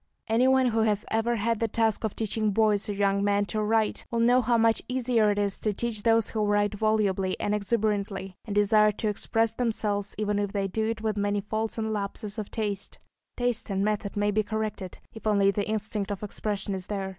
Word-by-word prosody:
Anyone 255 Hz, +3 st, +4 dB
who 225 Hz, -1 st, 0 dB
has 215 Hz, -2 st, +1 dB
ever 225 Hz, +2 st, +1 dB
had 230 Hz, 0 st, 0 dB
the 230 Hz, -, +1 dB
task 225 Hz, 0 st, 0 dB
of 220 Hz, -, -2 dB
teaching 220 Hz, 0 st, 0 dB
boys 210 Hz, 0 st, +2 dB
or -, -, 0 dB
young 200 Hz, 0 st, +1 dB
men 205 Hz, 0 st, +2 dB
to 215 Hz, +1 st, -2 dB
write 220 Hz, 0 st, +1 dB
will 235 Hz, -, -1 dB
know 245 Hz, +2 st, +5 dB
how 235 Hz, 0 st, +2 dB
much 225 Hz, 0 st, +3 dB
easier 245 Hz, -4 st, +2 dB
it 205 Hz, -, 0 dB
is 200 Hz, -1 st, 0 dB
to 215 Hz, -, -1 dB
teach 225 Hz, +1 st, -3 dB
those 225 Hz, 0 st, +2 dB
who 215 Hz, -2 st, 0 dB
write 205 Hz, 0 st, +2 dB
volubly 205 Hz, -3 st, 0 dB
and 205 Hz, -, 0 dB
exuberantly, 200 Hz, -3 st, -1 dB
and 205 Hz, -3 st, -5 dB
desire 210 Hz, +1 st, +4 dB
to 215 Hz, +1 st, -2 dB
express 225 Hz, +2 st, 0 dB
themselves, 215 Hz, -4 st, -1 dB
even 210 Hz, -1 st, 0 dB
if 205 Hz, -1 st, -2 dB
they 200 Hz, -1 st, 0 dB
do 220 Hz, +3 st, -1 dB
it 225 Hz, -1 st, -3 dB
with 215 Hz, -1 st, -1 dB
many 205 Hz, 0 st, 0 dB
faults 220 Hz, +3 st, -3 dB
and 220 Hz, -1 st, -1 dB
lapses 205 Hz, +1 st, -4 dB
of 210 Hz, -, -5 dB
taste; 205 Hz, -3 st, -3 dB, 0.4 s
taste 245 Hz, -2 st, -1 dB
and 195 Hz, 0 st, 0 dB
method 210 Hz, -1 st, -2 dB
may 205 Hz, 0 st, +2 dB
be 215 Hz, +1 st, +2 dB
corrected, 215 Hz, -3 st, -4 dB, 0.2 s
if 220 Hz, -1 st, -7 dB
only 200 Hz, -2 st, +4 dB
the 200 Hz, 0 st, -2 dB
instinct 215 Hz, -1 st, -2 dB
of 205 Hz, 0 st, -4 dB
expression 205 Hz, -1 st, -3 dB
is 185 Hz, -1 st, -5 dB
there. 195 Hz, -2 st, -3 dB
215 Hz, 215 wpm, -27 LUFS, 205-225 Hz, 0.4 s, know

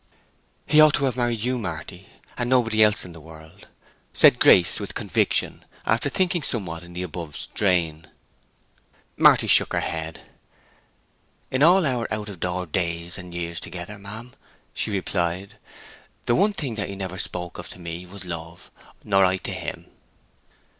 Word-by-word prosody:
"He 155 Hz, 0 st, +6 dB
ought 155 Hz, -1 st, +7 dB
to 140 Hz, -, +1 dB
have 130 Hz, -3 st, 0 dB
married 120 Hz, -3 st, -1 dB
you, 125 Hz, +2 st, 0 dB
Marty, 90 Hz, -1 st, -6 dB, 0.3 s
and 120 Hz, -1 st, -2 dB
nobody 115 Hz, -4 st, +3 dB
else 105 Hz, 0 st, +4 dB
in 90 Hz, -, -10 dB
the 80 Hz, -, -11 dB
world!" 80 Hz, 0 st, -14 dB, 0.5 s
said -, -, +6 dB
Grace, 90 Hz, -, +6 dB
with -, -, -5 dB
conviction, -, -, 0 dB, 0.2 s
after 115 Hz, +6 st, +1 dB
thinking 175 Hz, +3 st, 0 dB
somewhat 90 Hz, -, -2 dB
in 85 Hz, 0 st, -13 dB
the 90 Hz, +1 st, -4 dB
above 85 Hz, -3 st, -6 dB
strain. 85 Hz, -6 st, 0 dB, 1.1 s
Marty -, -, +6 dB
shook -, -, +4 dB
her -, -, +2 dB
head. 80 Hz, -1 st, -4 dB, 1.3 s
"In 130 Hz, -, 0 dB
all 175 Hz, +3 st, +6 dB
our 125 Hz, -4 st, -1 dB
out 105 Hz, -4 st, -4 dB
door 90 Hz, +1 st, -2 dB
days 85 Hz, +2 st, -3 dB
and 90 Hz, -1 st, -9 dB
years 85 Hz, -1 st, -4 dB
together, 90 Hz, +4 st, -8 dB
ma'am," 110 Hz, +5 st, -9 dB, 0.4 s
she -, -, -2 dB
replied, 95 Hz, -1 st, -2 dB, 0.7 s
"the 120 Hz, -, +2 dB
one 205 Hz, -, +3 dB
thing 135 Hz, -, -4 dB
he 100 Hz, -1 st, -3 dB
never 95 Hz, -1 st, -5 dB
spoke 90 Hz, -1 st, -4 dB
of -, -, -8 dB
to -, -, -8 dB
me 85 Hz, 0 st, -7 dB
was 95 Hz, 0 st, -10 dB
love; 85 Hz, 0 st, -7 dB, 0.3 s
nor 95 Hz, -1 st, +3 dB
I 95 Hz, 0 st, +3 dB
to -, -, -5 dB
him." -, -, -5 dB
95 Hz, 160 wpm, -24 LUFS, 85-115 Hz, 1.3 s, ought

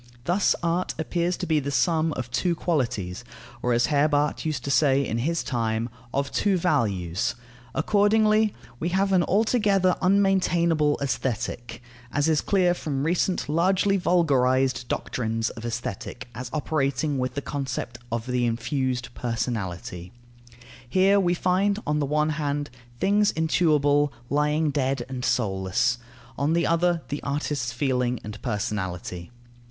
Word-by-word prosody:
Thus 180 Hz, +7 st, +2 dB
art 170 Hz, +2 st, 0 dB
appears 170 Hz, +2 st, -1 dB
to -, -, -3 dB
be 160 Hz, -2 st, +2 dB
the 140 Hz, 0 st, -3 dB
sum 160 Hz, +2 st, +2 dB
of 125 Hz, -3 st, -5 dB
two 170 Hz, +7 st, +1 dB
qualities, 120 Hz, -, -2 dB, 0.4 s
or, 125 Hz, -, 0 dB
as 120 Hz, 0 st, +3 dB
Herbart 145 Hz, 0 st, +1 dB
used 150 Hz, -5 st, -2 dB
to 140 Hz, -, -2 dB
say 140 Hz, 0 st, +3 dB
in 115 Hz, 0 st, -2 dB
his 165 Hz, +7 st, 0 dB
time, 115 Hz, -3 st, -1 dB, 0.2 s
of 140 Hz, 0 st, -1 dB
two 200 Hz, -2 st, +2 dB
values. 100 Hz, -, 0 dB, 0.4 s
Accordingly 215 Hz, +4 st, +3 dB, 0.2 s
we 170 Hz, -, -1 dB
have 195 Hz, +2 st, +1 dB
an 185 Hz, -, +5 dB
altogether 200 Hz, -2 st, +2 dB
unmaintainable 175 Hz, -6 st, +3 dB
Aesthetic, 120 Hz, -3 st, -3 dB, 0.3 s
as 145 Hz, +3 st, +1 dB
is 155 Hz, -2 st, +3 dB
clear 185 Hz, -3 st, +2 dB
from 140 Hz, -5 st, -3 dB
recent 175 Hz, +3 st, 0 dB
largely 185 Hz, +5 st, +2 dB
vulgarized 130 Hz, -8 st, +2 dB
doctrines 115 Hz, -1 st, -2 dB
of 115 Hz, 0 st, -9 dB
Aesthetic 120 Hz, +1 st, -5 dB
as 125 Hz, +2 st, -6 dB
operating 145 Hz, -2 st, 0 dB
with 125 Hz, 0 st, -2 dB
the 140 Hz, -, -2 dB
concept 125 Hz, -4 st, -4 dB
of 115 Hz, 0 st, -2 dB
the 125 Hz, -1 st, 0 dB
infused 125 Hz, +1 st, -2 dB
personality. 95 Hz, -7 st, -4 dB, 0.8 s
Here 195 Hz, +4 st, +4 dB
we 175 Hz, -2 st, +2 dB
find, 190 Hz, +3 st, +1 dB
on 150 Hz, 0 st, 0 dB
the 145 Hz, -, 0 dB
one 150 Hz, +2 st, +1 dB
hand, 145 Hz, -1 st, -2 dB, 0.3 s
things 205 Hz, +1 st, +3 dB
intuible 150 Hz, -3 st, +2 dB, 0.2 s
lying 150 Hz, +1 st, +2 dB
dead 135 Hz, -3 st, -1 dB
and 130 Hz, -1 st, -5 dB
soulless; 100 Hz, +2 st, +1 dB, 0.4 s
on 145 Hz, +3 st, +1 dB
the 170 Hz, 0 st, +2 dB
other, 170 Hz, 0 st, +2 dB
the 145 Hz, -, -3 dB
artist's 140 Hz, -3 st, -2 dB
feeling 125 Hz, -1 st, 0 dB
and 105 Hz, 0 st, -8 dB
personality. 95 Hz, -5 st, -3 dB
145 Hz, 140 wpm, -25 LUFS, 120-170 Hz, 0.8 s, an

